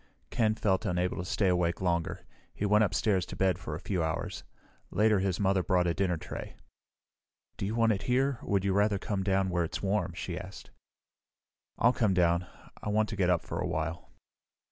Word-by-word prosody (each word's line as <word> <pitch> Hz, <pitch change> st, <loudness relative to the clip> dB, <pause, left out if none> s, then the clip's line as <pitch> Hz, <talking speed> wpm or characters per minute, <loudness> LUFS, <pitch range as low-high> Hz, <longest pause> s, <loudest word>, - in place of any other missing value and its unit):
Ken 110 Hz, -2 st, +2 dB
felt 100 Hz, -4 st, +1 dB
unable 90 Hz, 0 st, 0 dB
to 85 Hz, -, -3 dB
stay 95 Hz, +2 st, +1 dB
awake 90 Hz, -2 st, +1 dB
longer. 85 Hz, -3 st, -1 dB, 0.3 s
He 105 Hz, -, -2 dB
went 105 Hz, +1 st, +4 dB
upstairs 100 Hz, -1 st, +1 dB
to -, -, -7 dB
bed 95 Hz, -2 st, +1 dB
for 75 Hz, -7 st, -5 dB
a -, -, -5 dB
few 90 Hz, -2 st, -1 dB
hours. 80 Hz, 0 st, -3 dB, 0.5 s
Later, 105 Hz, -1 st, +3 dB
his 95 Hz, -2 st, 0 dB
mother 95 Hz, -1 st, +2 dB
brought 90 Hz, +1 st, +2 dB
a 85 Hz, -, +1 dB
dinner 90 Hz, -1 st, 0 dB
tray. -, -, -7 dB, 1.0 s
"Do 100 Hz, -, -3 dB
you 110 Hz, -, -2 dB
want 115 Hz, -1 st, +4 dB
it 100 Hz, -, -1 dB
here, 130 Hz, +1 st, +2 dB
or -, -, -10 dB
would 100 Hz, -1 st, +1 dB
you 100 Hz, -, +2 dB
rather 105 Hz, +1 st, +3 dB
come 100 Hz, 0 st, -2 dB
down 95 Hz, 0 st, +1 dB
where 85 Hz, 0 st, +1 dB
it's 85 Hz, -, -4 dB
warm?" 95 Hz, -3 st, 0 dB
she 90 Hz, -1 st, -4 dB
asked. 95 Hz, 0 st, -10 dB, 1.1 s
"I'll 120 Hz, +2 st, +4 dB
come 105 Hz, -6 st, +2 dB
down. 85 Hz, 0 st, +2 dB, 0.3 s
I -, -, -3 dB
want 110 Hz, +1 st, +2 dB
to 110 Hz, -, -4 dB
get 95 Hz, -3 st, +2 dB
up 90 Hz, -2 st, +2 dB
for -, -, -5 dB
a -, -, -1 dB
while." 80 Hz, +2 st, -3 dB
95 Hz, 205 wpm, -30 LUFS, 90-105 Hz, 1.1 s, went